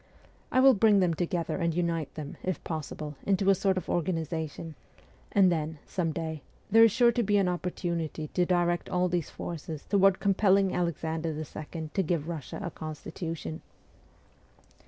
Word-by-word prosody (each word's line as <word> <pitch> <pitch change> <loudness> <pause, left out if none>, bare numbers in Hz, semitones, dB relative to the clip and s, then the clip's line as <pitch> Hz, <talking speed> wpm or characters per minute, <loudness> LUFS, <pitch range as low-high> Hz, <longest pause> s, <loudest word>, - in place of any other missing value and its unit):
I 255 - +3
will 265 0 +8
bring 210 -1 +5
them 180 -3 +3
together 170 0 -2
and 170 -3 0
unite 170 -4 -1
them, 150 -2 -7
if 185 -1 -3
possible, 150 -2 -5
into 195 0 +3
a - - +6
sort 195 0 +1
of 185 - -3
organisation; 160 -2 -2 0.6
and 190 -3 +5
then, 160 -1 -2
some 170 -3 -1
day, 160 -1 -4 0.3
there 225 +1 +8
is 230 - +6
sure 240 +3 +5
to 240 +1 0
be 205 -2 +2
an 195 -2 +3
opportunity 170 -3 -3
to 180 - +1
direct 175 -1 +1
all 180 0 +1
these 175 -3 -1
forces 160 -2 -6
toward 195 -1 +4
compelling 195 -1 +3
Alexander 165 -2 -2
II. 155 +1 -6
to 195 - +2
give 170 -3 0
Eussia 165 +4 -6
a 170 - -4
constitution. 155 - -6
170 Hz, 160 wpm, -29 LUFS, 160-190 Hz, 0.6 s, will